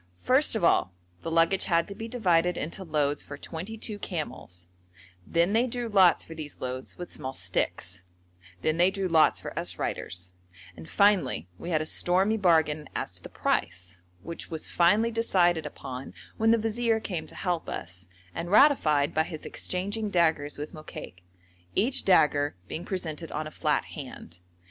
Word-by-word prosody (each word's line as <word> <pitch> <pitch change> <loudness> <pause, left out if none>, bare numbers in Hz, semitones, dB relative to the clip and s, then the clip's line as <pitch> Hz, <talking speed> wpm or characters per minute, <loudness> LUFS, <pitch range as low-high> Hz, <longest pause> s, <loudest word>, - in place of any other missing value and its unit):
First 260 0 +3
of 215 - -1
all 95 - +3 0.3
the - - -4
luggage 165 +3 +3
had 170 -1 +2
to 200 - -6
be 225 +3 -6
divided 180 -7 +2
into 170 +6 -4
loads 150 -4 0
for 145 - -8
twenty 180 +9 -6
two 210 -1 -4
camels, 150 - -6 0.6
then 170 +4 +2
they 235 +3 +3
drew 245 0 -3
lots 190 -4 +5
for 165 - -10
these 155 -2 -8
loads 130 0 -5
with 175 -1 -7
small 130 0 -5
sticks, 90 +2 -2 0.6
then 155 +1 +1
they 175 +2 +5
drew 195 -1 -2
lots 160 -3 +4
for - - -7
us - - -3
riders, 90 0 -3 0.4
and 80 - -11
finally 185 - +3
we 175 - -6
had 155 -3 +1
a - - -7
stormy 190 +6 +2
bargain 160 -6 +2
as - - -2
to - - -13
the - - -10
price, 90 0 -2 0.2
which 170 - -7
was 160 -1 -5
finally 210 +7 +3
decided 175 -8 +2
upon 130 -2 -8 0.2
when 225 0 +2
the 230 - +6
vizier 225 +1 +1
came 175 -7 -4
to - - -11
help 175 -3 -2
us, 90 +1 -6 0.3
and 170 - -4
ratified 170 - +5
by 155 - +3
his 160 -1 -5
exchanging 205 +4 -2
daggers 160 -5 +1
with 150 +1 -6
Mokaik, 155 - -9 0.5
each 245 +7 +1
dagger 150 -5 +4
being 170 - -5
presented 165 -4 -4
on 155 +1 -3
a 155 - -7
flat 150 -2 0
hand. 110 - -9
170 Hz, 170 wpm, -28 LUFS, 150-200 Hz, 0.6 s, the